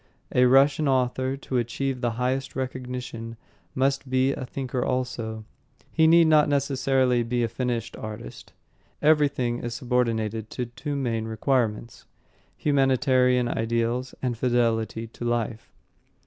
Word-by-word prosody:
A 125 - +5
Russian 135 +3 +4
author, 130 0 +1
to 135 -1 -3
achieve 125 +2 -2
the 120 -2 0
highest 130 +2 -1
recognition, 125 -3 -5 0.4
must 135 0 0
be 130 +1 +2
a 130 -2 -5
thinker 130 -1 -3
also. 115 -4 -3 0.5
He 160 -1 +4
need 165 +1 +6
not 155 -2 +5
necessarily 135 -3 +2
be 120 +1 -1
a - - +1
finished 120 -2 -3
artist. 105 - -8 0.5
Everything 145 -6 +2
is 120 0 -4
subordinated 115 -3 -1
to 125 - -3
two 140 +5 -5
main 115 -5 -1
requirements 115 0 -1 0.5
humanitarian 130 -3 +3
ideals 115 +3 -1
and 125 -2 0
fidelity 115 -2 0
to 115 +1 -10
life. 120 -1 -2
125 Hz, 125 wpm, -25 LUFS, 115-135 Hz, 0.5 s, need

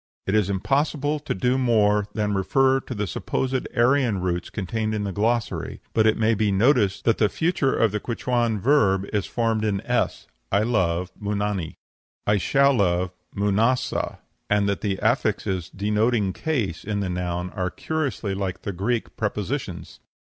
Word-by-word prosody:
It 95 - -1
is 105 -3 +2
impossible 145 +8 0
to 150 - -3
do 125 +7 +1
more 105 -4 +3
than 105 -2 0
refer 130 +7 +3
to 125 - -7
the 105 0 -1
supposed 130 +7 -2
Aryan 120 -3 +3
roots 90 -1 -2
contained 110 +2 -2
in 105 - -2
the 100 - -2
glossary, 110 +4 -1
but 110 -1 +4
it 110 - +3
may 115 +1 +3
be 105 -1 +1
noticed 105 -1 +2
that 115 - +3
the 105 - +4
future 160 - 0
of 115 -3 +3
the 105 - -1
Quichuan 120 -1 -1
verb 100 -6 +3
is 100 -6 0
formed 115 -2 0
in 105 -2 0
s 125 +1 -1 0.3
I 100 +2 +3
love, 90 -6 0
Munani; 100 -4 -2 0.5
I 105 0 +3
shall 140 +9 +3
love, 90 -5 +1 0.2
Munasa 105 +5 +1 0.3
and 105 -1 +2
that 100 -1 -1
the 100 -3 -1
affixes 105 - 0
denoting 105 0 +1
cases 115 - -2
in 100 -1 -2
the 100 - -1
noun 90 0 -3
are 90 -2 -2
curiously 135 -10 -2
like 95 -1 -4
the 100 - -3
Greek 110 +6 -2
prepositions." 105 - -3
105 Hz, 165 wpm, -24 LUFS, 95-120 Hz, 0.5 s, but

